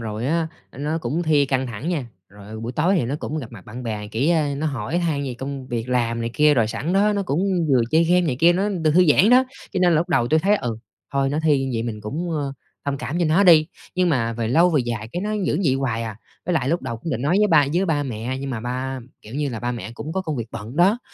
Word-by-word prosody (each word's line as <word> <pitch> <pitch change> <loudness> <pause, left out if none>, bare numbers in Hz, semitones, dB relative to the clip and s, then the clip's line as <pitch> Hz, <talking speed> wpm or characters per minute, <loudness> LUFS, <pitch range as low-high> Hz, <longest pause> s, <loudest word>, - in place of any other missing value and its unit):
rồi 110 +1 -4
á, 165 +3 +1 0.2
ơ, - - -14
nó 150 +3 -1
cũng 155 +4 -2
thi 150 -4 +3
căng 130 -1 0
thẳng 120 +6 -5
nha, 155 -9 -1 0.2
rồi, 100 0 -14
ờ, 110 0 -7
buổi 115 +2 -4
tối 165 +9 +2
thì 165 - +1
nó 125 +4 -2
cũng 155 - -4
gặp 125 -5 -7
mặt 100 -5 -11
bạn 120 +4 -8
bè, 105 -3 -4
kiểu, 135 +11 +1
ơ, 150 -3 +1
nó 150 +3 -2
hỏi 135 +3 -2
han 160 -5 0
về 130 - -4
công 135 -1 -5
việc 120 -1 -3
làm 115 -2 0
này 115 0 -2
kia, 150 0 +5
rồi 115 -5 +3
sẵn 115 +10 -3
đó 205 +2 +3
nó 200 - 0
cũng 160 -3 -1 0.3
vừa 130 -3 +4
chơi 160 +1 +4
game 180 +2 +4
này 155 -8 -1
kia, 170 +1 +6
nó 195 +4 0
được 165 -6 0
thư 180 +1 +6
giãn 190 +9 +5
đó. 255 +1 +6 0.3
Cho - - -1
nên 180 -1 +4
là - - +4
lúc 170 +4 0
đầu 130 -9 +2
tui 155 +3 +3
thấy 205 +5 +3
"Ừ, 120 - -3 0.4
thôi 135 0 +1
nó 145 +2 -1
thi 145 -4 +3
như 135 - -3
vậy 115 - -1
mình 115 -2 -4
cũng, 155 +12 -4
ờ, 145 -3 -2 0.3
thông 140 -1 -1
cảm 160 +7 -3
cho 175 - +2
nó 160 +6 +3
đi." 160 -4 +7 0.3
Nhưng 180 -1 +2
mà 120 -7 +1
về 115 -1 -2
lâu 170 +9 +4
về 150 -5 +3
dài 110 -2 -4
cái 175 - -2
nó 210 - -2 0.2
vẫn 150 - +1
vậy 135 -4 +3
hoài 120 -4 -1
à, 110 -3 -5 0.3
với 180 - 0
lại 135 -6 +1
lúc 170 +3 0
đầu 115 - -4
cũng 160 +9 -6
định 120 - -2
nói 155 +6 +2
với 210 - +4
ba 150 -7 +5
với 185 - +2
ba 150 -4 +1
mẹ 125 0 -4
nhưng 135 0 -4
mà 120 -4 -3
ba 130 +3 -3 0.2
kiểu 110 - -11
như 145 0 -1
là, 115 -4 -5
ba 120 +1 -2
mẹ 115 -3 -6
cũng 155 +6 -6
có 190 - -1
công 155 -5 -3
việc 115 -3 -3
bận 115 +3 -8
đó, 190 +7 +4
140 Hz, 300 wpm, -22 LUFS, 120-165 Hz, 0.4 s, đi